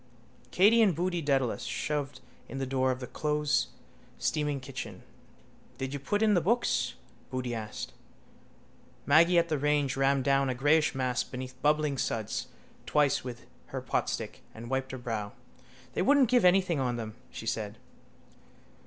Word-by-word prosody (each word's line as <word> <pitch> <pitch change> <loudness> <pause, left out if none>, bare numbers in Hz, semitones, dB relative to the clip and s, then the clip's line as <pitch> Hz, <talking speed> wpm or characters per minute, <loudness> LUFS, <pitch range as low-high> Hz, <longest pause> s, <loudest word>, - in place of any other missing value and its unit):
Katey 210 - +5
and 195 -7 +4
Boody 175 +1 -1
Dedalus 135 -5 +1
shoved 145 +3 -3 0.3
in 135 - -6
the 135 - -1
door 130 0 +1
of 130 0 -2
the - - -3
closesteaming 150 0 -2
kitchen. 130 -1 -7 0.7
—Did 135 +1 -4
you 145 - -3
put 205 +10 0
in 215 -1 +4
the 175 - +3
books? 235 +8 +1 0.3
Boody 130 -2 -3
asked. 110 -2 -5 1.1
Maggy 170 +5 +5
at 170 0 +4
the 155 -2 0
range 145 -2 +1
rammed 135 0 +2
down 135 0 +3
a 130 - -1
greyish 145 +3 +3
mass 130 -2 0
beneath 130 0 -7
bubbling 150 -2 +2
suds 110 -1 -2 0.4
twice 145 -3 +2
with 125 -2 -7 0.2
her - - -4
potstick - - -2
and 120 +3 -8
wiped 130 0 -1
her 130 - -5
brow. 110 -4 -4 0.6
—They - - 0
wouldn't 270 +4 +5
give 245 -5 +4
anything 180 -3 +4
on 125 -2 0
them, 110 -2 -5 0.2
she - - -8
said. 110 -1 -3
140 Hz, 155 wpm, -30 LUFS, 130-155 Hz, 1.1 s, Katey